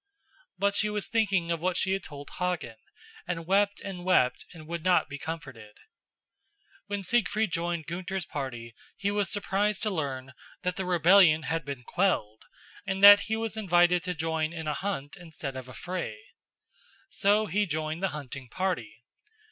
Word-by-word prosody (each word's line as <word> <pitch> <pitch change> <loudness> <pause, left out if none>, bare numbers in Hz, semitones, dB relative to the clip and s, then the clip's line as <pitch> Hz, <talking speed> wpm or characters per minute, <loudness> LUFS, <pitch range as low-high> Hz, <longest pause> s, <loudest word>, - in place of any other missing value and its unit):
But 200 0 +2
she 210 +1 +2
was 210 -1 -3
thinking 195 -7 +1
of 170 - 0
what 180 +2 0
she 190 - +1
had 195 0 0
told 145 -4 -10
Hagen, 180 -11 -2 0.5
and 165 -2 -3
wept 200 +3 +2
and 185 -3 -6
wept 180 -9 +2
and 160 -3 -12
would 170 -1 -4
not 185 -1 +3
be 145 -1 -7
comforted. 135 -10 -7 1.1
When 205 -1 -3
Siegfried 215 0 +1
joined 170 -1 -2
Gunther's 180 +2 -4
party 120 -5 -6 0.2
he 200 0 -1
was 205 -3 0
surprised 205 +1 0
to 215 - 0
learn 135 -6 -3 0.3
that 180 -1 -1
the 190 - -3
rebellion 175 -2 +5
had 165 +1 -2
been 140 -4 -6
quelled 120 - 0 0.4
and 195 0 -2
that 205 0 +10
he 220 - +1
was 225 0 -3
invited 175 -4 +3
to 180 -1 -2
join 160 0 -1
in 160 -2 -5
a 150 - 0
hunt 160 -6 -4
instead 160 -5 -7
of 130 -1 -7
a - - -10
fray. 175 -10 -4 0.9
So 205 +2 +3
he 205 +2 0
joined 155 +1 -3
the 195 - +2
hunting 140 -5 -7
party. 190 - -3
175 Hz, 170 wpm, -28 LUFS, 155-195 Hz, 1.1 s, that